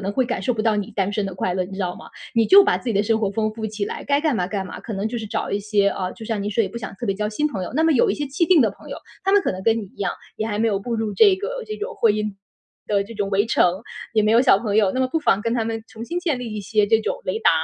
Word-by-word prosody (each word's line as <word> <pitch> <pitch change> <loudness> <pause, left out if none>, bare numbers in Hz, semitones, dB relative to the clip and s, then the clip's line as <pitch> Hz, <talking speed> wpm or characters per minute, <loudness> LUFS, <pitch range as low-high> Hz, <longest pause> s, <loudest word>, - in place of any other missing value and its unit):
能 195 - -1
会 260 +3 +1
感 245 - -2
受 250 - 0
不 215 - -2
到 220 -1 +2
你 205 -2 -2
单 195 0 -1
身 205 -1 -1
的 190 - -6
快 185 0 -1
乐， 185 0 -1
你 195 - -11
知 190 - -8
道 180 -2 -2
吗？ - - -12 0.3
你 230 -1 +3
就 395 +1 +8
把 - - +2
自 250 - -6
己 225 - 0
的 200 - +3
生 220 +1 +1
活 205 -3 0
丰 215 0 -1
富 220 0 -4
起 210 -1 -3
来， - - -5
该 285 +1 +1
干 310 -4 +2
嘛 180 -5 0
干 195 -1 -3
嘛。 - - -8
可 220 - -6
能 195 +2 -2
就 235 +2 -3
是 220 - -6
找 220 +1 -3
一 200 - -1
些 205 -1 +2
啊， 185 -2 -3
就 225 - -10
像 220 -2 -2
您 205 - -2
说 225 +2 +2
也 195 - -1
不 235 - -7
想 205 -3 -7
特 215 - -7
别 200 -3 0
交 210 +1 -2
新 295 +8 0
朋 200 -10 -4
友， - - -5
那 310 - +2
么 325 - +4
有 255 - +3
一 - - 0
些 295 - -3
既定 315 +3 +3
的 220 - +2
朋 200 - -15
友。 - - -5 0.3
她 385 +1 +1
们 405 0 +5
可 - - 0
能 185 - -7
跟 225 +2 +3
你 215 - -4
一 190 - -18
样， 195 -3 -1 0.2
也 220 - -2
还 210 -2 -2
没 225 - +2
有 200 -3 0
步 235 +3 -3
入 220 -2 -2
这 400 - +5
个 - - -4
这 430 -1 -5
种 440 +4 -5
婚 225 -3 +3
姻 210 -1 -2 0.5
的 200 -1 +1
这 220 +3 -10
种 200 -2 -2
围 200 +2 +2
城， 185 -4 +2 0.3
也 220 -2 +3
没 215 - +2
有 235 +2 +6
小 245 -7 +5
朋 210 -1 -1
友， 205 -3 +4
那 260 - -1
么 260 - +3
不 325 - 0
妨 205 -10 +2
跟 230 +2 -1
她 230 -2 0
们 225 0 -3
重 225 +1 -8
新 345 +8 -3
建 320 -7 0
立 240 -3 -5
一 210 - -3
些 210 +1 +1
这 225 +1 +3
种 - - -2
雷 - - -1
达。 - - +4
220 Hz, 380 characters per minute, -22 LUFS, 200-250 Hz, 0.5 s, 就